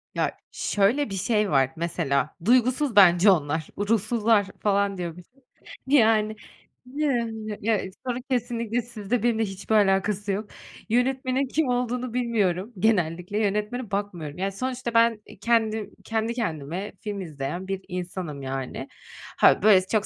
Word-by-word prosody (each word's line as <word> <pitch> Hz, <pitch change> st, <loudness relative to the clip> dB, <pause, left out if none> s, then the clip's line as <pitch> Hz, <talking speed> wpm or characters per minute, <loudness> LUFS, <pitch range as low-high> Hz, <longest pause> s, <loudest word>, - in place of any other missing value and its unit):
Ya, -, -, -1 dB
şöyle 220 Hz, +6 st, +1 dB
bir 195 Hz, -, -4 dB
şey 210 Hz, 0 st, +1 dB
var, 135 Hz, -1 st, +3 dB
mesela 160 Hz, -4 st, -1 dB
duygusuz 255 Hz, +1 st, +3 dB
bence 185 Hz, 0 st, +7 dB
onlar, 155 Hz, -2 st, 0 dB
ruhsuzlar 215 Hz, 0 st, +2 dB
falan, 200 Hz, -1 st, +1 dB
diyormuşum. 180 Hz, +9 st, -8 dB, 0.5 s
Yani, 220 Hz, -5 st, +4 dB, 0.5 s
yani. 235 Hz, -6 st, -2 dB
Ya, 220 Hz, -1 st, +2 dB, 0.3 s
sorun 250 Hz, 0 st, -2 dB
kesinlikle 240 Hz, -1 st, -1 dB
sizde, 225 Hz, 0 st, -3 dB
benimle 225 Hz, -2 st, +2 dB
hiçbir 195 Hz, +3 st, -3 dB
alakası 200 Hz, 0 st, +2 dB
yok. 205 Hz, +2 st, -3 dB, 0.4 s
Yönetmenin 260 Hz, +3 st, +1 dB
kim 300 Hz, +2 st, 0 dB
olduğunu 250 Hz, 0 st, -1 dB
bilmiyorum 225 Hz, -4 st, 0 dB
genellikle. 180 Hz, -2 st, +1 dB
Yönetmene 210 Hz, +3 st, -1 dB
bakmıyorum. 180 Hz, -7 st, -4 dB
Ya, 195 Hz, +1 st, -1 dB
sonuçta 250 Hz, +2 st, -4 dB
ben, 230 Hz, -2 st, +4 dB
eee, 210 Hz, -, -14 dB
kendim 220 Hz, -1 st, +1 dB
kendi 225 Hz, +1 st, -1 dB
kendime 180 Hz, -, -4 dB
film 205 Hz, -2 st, -4 dB
izleyen 155 Hz, +3 st, -5 dB
bir 195 Hz, -1 st, -3 dB
insanım, 180 Hz, -5 st, -5 dB
yani. 135 Hz, -1 st, -5 dB, 0.5 s
Ha, -, -, +5 dB
böyle, 205 Hz, -3 st, +7 dB
çok 215 Hz, 0 st, +1 dB
210 Hz, 130 wpm, -25 LUFS, 185-235 Hz, 0.5 s, bence